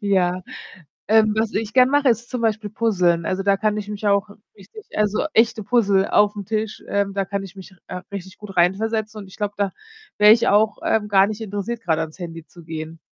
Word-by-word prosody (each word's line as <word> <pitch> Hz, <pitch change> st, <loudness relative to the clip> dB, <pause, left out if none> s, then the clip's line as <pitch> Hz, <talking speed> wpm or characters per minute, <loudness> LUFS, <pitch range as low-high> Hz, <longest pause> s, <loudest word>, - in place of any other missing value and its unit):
Ja. 185 Hz, -3 st, +1 dB, 0.7 s
Ähm, 215 Hz, 0 st, +4 dB
was 220 Hz, 0 st, 0 dB
ich 215 Hz, 0 st, -3 dB
gern 255 Hz, 0 st, +5 dB
mache, 285 Hz, -2 st, +3 dB
ist 235 Hz, +1 st, 0 dB
zum 250 Hz, -, -4 dB
Beispiel 220 Hz, -2 st, -1 dB
puzzlen. 180 Hz, -7 st, +1 dB
Also, 190 Hz, +1 st, -1 dB
da 200 Hz, -1 st, +3 dB
kann 215 Hz, +1 st, 0 dB
ich 210 Hz, 0 st, -5 dB
mich 210 Hz, 0 st, -3 dB
auch 200 Hz, 0 st, +2 dB, 0.3 s
richtig 210 Hz, -, -14 dB
also, 210 Hz, +4 st, +1 dB
echte 225 Hz, 0 st, +3 dB
Puzzle 200 Hz, -3 st, +2 dB
auf'm 205 Hz, -1 st, +2 dB
Tisch, 215 Hz, 0 st, -3 dB
ähm, 200 Hz, -1 st, -1 dB
da 195 Hz, 0 st, -1 dB
kann 195 Hz, +1 st, -3 dB
ich 195 Hz, 0 st, -11 dB
mich, 190 Hz, 0 st, -12 dB
äh, 180 Hz, 0 st, -6 dB
richtig 190 Hz, -1 st, -8 dB
gut 210 Hz, -2 st, -11 dB
reinversetzen 215 Hz, +4 st, 0 dB
und 200 Hz, -, -11 dB
ich 190 Hz, -, -14 dB
glaube, 205 Hz, -1 st, -3 dB
da 200 Hz, -1 st, 0 dB, 0.5 s
wäre 210 Hz, 0 st, +7 dB
ich 230 Hz, +1 st, +4 dB
auch, 215 Hz, +2 st, +3 dB
ähm, 210 Hz, -1 st, +1 dB
gar 195 Hz, -1 st, +5 dB
nicht 215 Hz, +1 st, -6 dB
interessiert, 210 Hz, +2 st, -4 dB
grade 160 Hz, -5 st, 0 dB
ans 160 Hz, +3 st, -7 dB
Handy 165 Hz, -2 st, -7 dB
zu 170 Hz, +2 st, -16 dB
gehen. 160 Hz, 0 st, -7 dB
205 Hz, 215 wpm, -21 LUFS, 190-220 Hz, 0.7 s, wäre